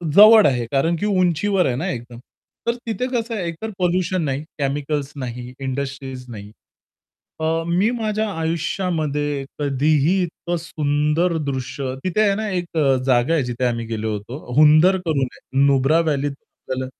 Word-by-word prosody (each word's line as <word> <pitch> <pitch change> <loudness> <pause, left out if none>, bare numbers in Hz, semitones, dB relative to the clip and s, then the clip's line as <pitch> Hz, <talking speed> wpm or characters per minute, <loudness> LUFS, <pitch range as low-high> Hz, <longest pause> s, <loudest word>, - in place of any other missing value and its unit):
जवळ 215 +1 +9
आहे 125 -3 0
कारण, 155 +5 +2
की 205 - -3
उंचीवर 185 0 +2
आहे 125 - 0
ना 130 - -2
एकदम. 120 -1 -7 0.5
तर 235 - +2
तिथे 230 +2 -2
कसं 230 -1 -1
आहे, 190 -5 -3
एकतर 170 +7 -5
पोल्युशन 180 0 +1
नाही, 140 -1 -2 0.2
केमिकल्स 145 0 -2
नाही, 125 -2 -6
इंडस्ट्रीज 135 -1 -5
नाही. 105 -2 -9 0.9
अ, 160 - -1 0.2
मी 180 +6 +2
माझ्या 220 -2 -1
आयुष्यामध्ये 155 -4 -1
कधीही 150 +5 +2
इतकं 175 0 -4
सुंदर 150 +2 0
दृश्य 130 -1 -3
तिथे 185 +3 +1
आहे 200 -2 +3
ना 215 +1 -2
1 175 -3 -3 0.3
जागा 130 +4 +3
आहे 155 - +2
जिथे 125 0 -4
आम्ही 115 -1 -1
गेलो 110 -1 -3
होतो. 105 +7 -6 0.2
हुंदर 155 +5 +6
करून 140 -5 +1 0.4
नुब्रा 140 +3 +3
व्हॅलीतून 145 -3 -2 0.2
आपल्याला 130 0 -2
150 Hz, 150 wpm, -21 LUFS, 135-180 Hz, 0.9 s, जवळ